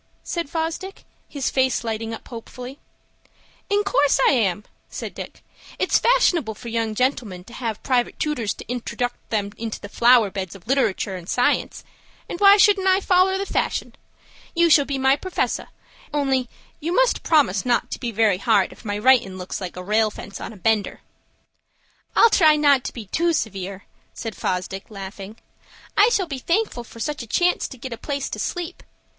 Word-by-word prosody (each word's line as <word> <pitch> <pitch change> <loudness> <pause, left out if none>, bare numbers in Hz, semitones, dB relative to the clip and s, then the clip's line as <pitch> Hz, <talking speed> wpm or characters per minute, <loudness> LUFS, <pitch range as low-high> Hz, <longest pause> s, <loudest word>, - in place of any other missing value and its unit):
said 340 -4 -3
Fosdick, 330 +5 -4 0.3
his 280 -3 -2
face 260 -2 +1
lighting 225 0 -3
up 225 - -8
hopefully. 250 +3 -9 0.9
"In 410 0 +2
course 290 -9 +2
I - - +6
am," 210 -7 +1 0.3
said - - -6
Dick. - - -9 0.3
"It's - - +2
fashionable 350 - +2
for 235 +2 -8
young 225 -1 -1
gentlemen 230 -7 -1
to 235 - -15
have 230 -4 -4
private 250 -3 0
tootors 260 -9 -1
to - - -9
introduct 245 0 -4
'em 205 -2 -1
into 225 -1 -4
the 205 - -9
flower 235 -2 +5
beds 190 -2 -5
of 190 - -14
literatoor 225 -7 +1
and 175 - -12
science, 245 0 0 0.4
and 345 - -6
why 400 0 +8
shouldn't 400 -2 +4
I 375 0 +5
foller 380 0 +3
the 395 - -2
fashion? - - -2 0.6
You 340 0 +4
shall 290 -2 +6
be 275 0 -2
my 265 0 +4
perfessor; 370 +5 -2 0.4
only 270 -4 0 0.3
you 330 +3 -2
must - - +3
promise 270 - +3
not 245 -2 0
to - - -4
be 240 - -3
very 215 -4 +2
hard 205 -2 +2
if - - -18
my 205 -2 -3
writin' 215 -5 +3
looks 185 +2 -5
like 180 -2 -6
a 180 - -6
rail 215 +3 +2
fence 200 -2 -9
on - - -6
a 215 - -12
bender." 215 +2 0 1.1
"I'll 460 - +6
try 315 -7 +6
not 285 -3 +4
to - - -3
be 230 -4 -8
too 335 - +1
severe," 195 - -3 0.3
said 225 -2 -5
Fosdick, 185 +1 -3
laughing. 195 +1 -8 0.6
"I 415 +3 +6
shall 400 -5 +1
be 280 -6 -5
thankful 340 - -1
for 230 - -14
such 300 +4 -3
a 235 - -8
chance 355 +10 +1
to 260 - -11
get 250 0 -6
a - - -7
place 280 -2 -3
to - - -4
sleep. 350 0 -4
245 Hz, 185 wpm, -22 LUFS, 215-315 Hz, 1.1 s, why